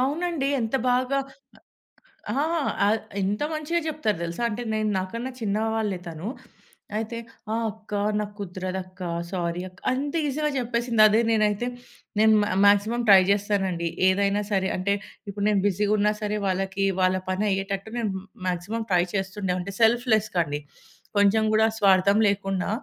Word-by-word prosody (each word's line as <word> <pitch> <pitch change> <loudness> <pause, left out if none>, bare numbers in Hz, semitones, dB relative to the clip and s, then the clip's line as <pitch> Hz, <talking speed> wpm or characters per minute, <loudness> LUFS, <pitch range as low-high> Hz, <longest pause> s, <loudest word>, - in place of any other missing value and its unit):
అవునండి. 295 +1 0
ఎంత 225 +2 -2 0.2
బాగా 255 +2 +1 1.1
ఆహ్ 300 +8 0 0.3
ఆ! - - +4
య - - -1 0.2
ఎంత 205 +7 0
మంచిగా 310 +2 -1
జెప్తారు 295 - -1
దెలుసా? 170 +5 -4
అంటే 230 +2 -4
నేను 215 0 0
నాకన్నా 230 +7 -4
చిన్నవాళ్లే 220 -1 -1
తను. 165 +3 -6 0.7
అయితే 225 +1 -3 0.4
"ఆ! - - +1 0.2
అక్కా 215 -1 -5 0.2
నాకు 210 -1 -4
కుదరదు 185 -1 -4
అక్కా, 185 -1 -8 0.2
సారీ 175 -2 -2
అక్క" 185 - -22
అంత 280 +3 -2
ఈజీగా 300 +2 0
జెప్పేసింది. 235 -2 +1
అదే 215 +1 +3
నేనైతే 215 +1 +2 0.5
నేను 220 0 +6
మా - - -1 0.2
మాక్సిమం 205 +4 +4
ట్రై 195 -1 +10
జేస్తానండి. 195 -4 0 0.2
ఏదైనా 200 +2 +2
సరే 190 -1 +1
అంటే 195 +2 0 0.4
ఇప్పుడు 200 0 -4
నేను 205 -2 +3
బిజీగున్నా 205 +2 +2
సరే, 210 0 -1
వాళ్ళకి 190 +1 -1 0.2
వాళ్ళపని 185 +2 +1
అయ్యేటట్టు 195 +2 -3
నేను 225 -4 -1 0.4
మాక్సిమం 185 +6 -2
ట్రై 175 -1 +4
చేస్తుండే. 190 -1 -2
అంటే 195 +2 -5
సెల్ఫ్‌లెస్‌గా 220 -4 +3
అండి. 145 0 -3 0.6
కొంచెం 205 +2 +4
గూడా 220 +1 +5
స్వార్థం 200 0 +4
లేకుండా 195 -2 -1
205 Hz, 140 wpm, -25 LUFS, 190-225 Hz, 1.1 s, ట్రై